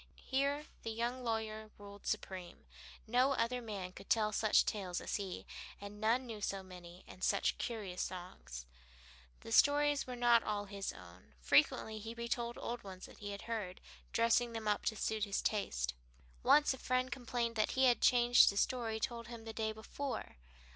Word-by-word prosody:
Here 280 +2 +1 0.2
the 225 - -4
young 240 +3 -2
lawyer 220 -2 -2
ruled 200 0 -11
supreme. 185 -2 -4 0.4
No 250 +4 +3
other 245 0 0
man 200 -5 -5
could 195 +1 -13
tell 215 -2 +3
such 215 +1 +4
tales 185 -4 -2
as - - -2
he, 195 -3 -5 0.3
and 205 +1 -9
none 235 +4 +2
knew 220 -3 -7
so 195 -1 -2
many 180 -1 -11
and 185 - -11
such 200 - +2
curious 205 -6 -3
songs. 175 - -6 0.8
The - - -9
stories 290 - +4
were 250 - -4
not 240 -1 +5
all 205 -2 -2
his 200 -1 -4
own; 85 -5 -15
frequently 215 - +3
he 225 +2 -6
retold 235 0 -2
old 240 0 -4
ones 190 -2 -8
that - - -14
he 205 - -5
had 200 0 -6
heard, 210 -6 -4 0.3
dressing 230 +1 +3
them 225 -1 -4
up 210 -1 +1
to 220 - +1
suit 215 0 0
his 200 -1 -1
taste. 60 - -1 0.5
Once 295 -2 +5
a 265 - -9
friend 255 +1 0
complained 240 -2 -2
that 215 - +2
he 265 0 +4
had 245 -2 +4
changed 245 -2 +6
a 200 - -6
story 225 -2 0
told 235 +1 -3
him 235 -1 -9
the 225 - -6
day 220 -1 -1
before. 220 - -5
220 Hz, 180 wpm, -36 LUFS, 200-240 Hz, 0.8 s, changed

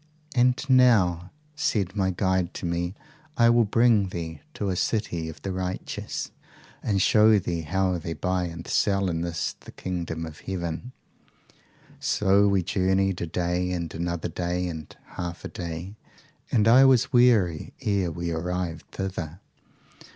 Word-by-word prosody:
"'And 125 0 +3
now, 105 -10 +4 0.3
said 100 - 0
my 95 -2 +1
guide 95 -1 0
to - - -5
me, 85 +2 -2 0.4
I 115 0 +6
will 120 -1 +4
bring 110 -2 +3
thee 80 -4 -6
to 100 - -2
a 95 - 0
city 85 -5 -1
of 80 - -10
the 95 - -2
righteous, 95 0 -4 0.5
and 100 -2 0
show 105 +3 +5
thee 85 -3 -2
how 90 +3 0
they 85 +1 -4
buy 90 +3 -1
and 85 0 -7
sell 100 -2 +1
in 80 0 -2
this 85 -1 -2
the - - -12
kingdom 85 -3 -4
of 80 -2 -10
heaven. 90 +5 -4 1.1
So 100 0 +3
we 100 -2 +2
journeyed 95 +1 +1
a 85 - -2
day 90 +2 -1
and 85 -2 -4
another 85 0 -3
day 90 0 -2
and 80 -3 -7
half 85 -1 -6
a - - -4
day, 85 +3 -6 0.5
and 110 -2 +3
I 125 +4 +8
was 135 0 +4
weary 110 -10 +3
ere 100 -4 +1
we 85 +1 -3
arrived 85 0 -3
thither. 90 -4 -4
90 Hz, 150 wpm, -26 LUFS, 85-100 Hz, 1.1 s, I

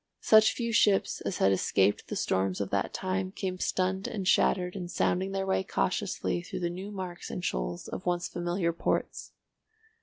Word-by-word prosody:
Such 220 0 +6
few 235 -2 -2
ships 205 -2 +3
as 185 - -2
had 95 - +4
escaped 95 +1 +2
the - - -4
storms 95 0 0
of 100 -1 -3
that 100 - 0
time 185 0 -2
came 185 -2 -4
stunned 190 +1 0
and 195 -4 -4
shattered 180 -1 +3
and 180 -3 -5
sounding 185 +2 0
their 195 0 -1
way 190 0 +1
cautiously 185 -1 -1
through 175 - -6
the 170 -1 -1
new 185 +3 -6
marks 185 -4 -6
and 180 - -4
shoals - - -3
of 185 - -6
once 175 0 0
familiar 175 0 -1
ports. - - -2
185 Hz, 180 wpm, -29 LUFS, 175-190 Hz, -, Such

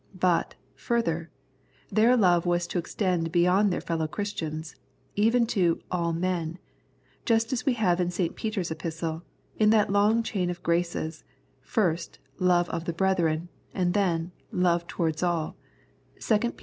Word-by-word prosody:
But, 175 -2 +2 0.2
further, 170 -9 -1 0.6
their 235 +4 +4
love 175 -5 +3
was 175 0 +1
to 175 - -2
extend 175 -2 -1
beyond 180 +4 +3
their - - -1
fellow 160 -2 -1
Christians 160 -4 -4 0.2
— - - -38
even 230 +3 +3
to 175 -5 +2
" - - -31
all 170 -2 0
men," 170 -1 -2 0.7
just 230 0 +2
as 250 +2 -3
we 265 - +4
have 185 -6 +2
in 175 - 0
St. 175 -1 -2
Peter's 205 -6 -3
Epistle, 160 0 -4 0.4
in 215 -1 +5
that 215 -2 +4
long 210 +3 +3
chain 190 -5 -1
of 175 0 -5
graces, 170 -1 -1 0.4
first, 175 -7 -1 0.2
love 175 -2 +3
of 170 -1 -3
the 170 - -2
brethren, 170 -2 +1 0.3
and 175 -1 +1
then, 175 -4 0 0.2
love 175 -1 +1
towards 160 -2 -1
all 170 -3 0 0.6
(2 215 - +2
Pet. 240 +2 -1
175 Hz, 155 wpm, -27 LUFS, 165-205 Hz, 0.7 s, in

